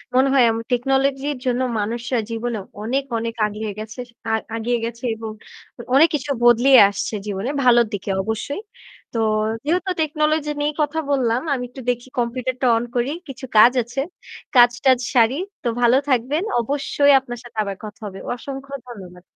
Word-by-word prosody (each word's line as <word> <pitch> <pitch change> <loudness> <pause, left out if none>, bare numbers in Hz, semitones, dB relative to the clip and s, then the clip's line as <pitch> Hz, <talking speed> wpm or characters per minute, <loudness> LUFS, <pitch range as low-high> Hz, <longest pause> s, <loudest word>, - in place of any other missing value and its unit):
মনে 260 +1 +5
হয় 265 - +6
আম 225 - -2
টেকনোলজি 270 +2 +1 0.2
জন্য 250 0 +1 0.2
মানুষরা 235 +3 -2
জীবনে 230 0 -3 0.2
অনেক, 260 +5 0
অনেক, 230 0 -3
আগিয়ে 210 0 -5
গেছেস 225 +3 -7 0.2
আ - - +1 0.2
আগিয়ে 235 +2 0
গেছে 235 +2 -7
এবং 220 0 -6 0.5
অ - - -4
অনেক 320 +3 +7
কিছু 285 0 -3
বদলিয়ে 240 +2 +7
আসছে 205 +2 -4
জীবনে, 200 +4 -3
ভালোর 240 -1 +5
দিকে 200 0 -4
অবশ্যই। 220 - -3 0.5
তো 230 - -1 0.5
যেহেতু 360 +4 0
টেকনোলজি 305 0 0
নিয়ে 295 - +1
কথা 300 +2 0
বললাম, 245 -3 +1
আমি 255 -2 -2
একটু 260 +2 -10
দেখি 245 +1 -2
কম্পিউটারটা 255 +2 -1
অন 230 - -1
করি। 245 +3 0 0.2
কিছু 265 0 -8
কাজ 225 +3 +9
আছে, 245 +4 -6 0.6
কাজ 240 -1 +8
টাজ 260 -2 +5 0.2
সারি। 240 +2 +4 0.3
তো - - -1
ভালো 240 +1 +5
থাকবেন। 265 +7 +1 0.2
অবশ্যই 285 +3 +2
আপনার 245 -2 -8
সাথে 240 -2 -14
আবার 200 -1 -4
কথা 215 +1 -10
হবে। 195 -1 -7 0.2
অসংখ্য 275 +2 -8
ধন্যবাদ। 185 -7 -11
245 Hz, 165 wpm, -21 LUFS, 230-270 Hz, 0.6 s, কাজ